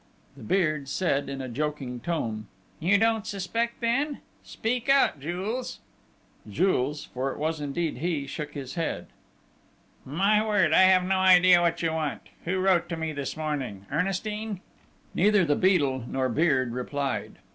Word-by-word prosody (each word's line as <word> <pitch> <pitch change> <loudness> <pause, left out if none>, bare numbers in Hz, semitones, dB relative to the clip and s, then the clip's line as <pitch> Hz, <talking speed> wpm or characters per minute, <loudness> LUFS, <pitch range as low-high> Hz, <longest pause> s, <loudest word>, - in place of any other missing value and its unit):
The 135 - -14
Beard 155 - 0
said 140 -3 0
in 135 -1 -5
a - - -5
joking 135 -1 -3
tone: 115 -10 -3 0.3
"You 185 +5 +3
don't 225 0 +1
suspect, 230 +4 -2
then? 275 +5 0 0.2
Speak 245 +3 -3
out, 275 - +4
Jules!..." 190 - -4 0.7
Jules 150 - 0
for 130 +2 -2
it - - -8
was 155 0 -2
indeed 145 -1 -2
he 155 -3 -1
shook 150 +1 -6
his 135 -3 -6
head. 165 -2 -3 0.9
"My 195 +10 +2
word, 205 -7 +2
I - - +7
have 185 -1 +5
no 190 +1 +1
idea 185 -1 +6
what 170 0 0
you 165 - +1
want!... 155 -3 -3 0.2
Who 180 +3 0
wrote 185 -2 +2
to 165 - -3
me 160 -1 -3
this 140 0 -4
morning? 140 -11 -4
Ernestine?" 195 +4 -2 0.5
Neither 205 -1 +4
the 145 -2 +2
Beadle 140 -10 +2
nor 130 0 -1
Beard 130 -3 +2
replied. 140 +3 -3
165 Hz, 155 wpm, -27 LUFS, 140-190 Hz, 0.9 s, I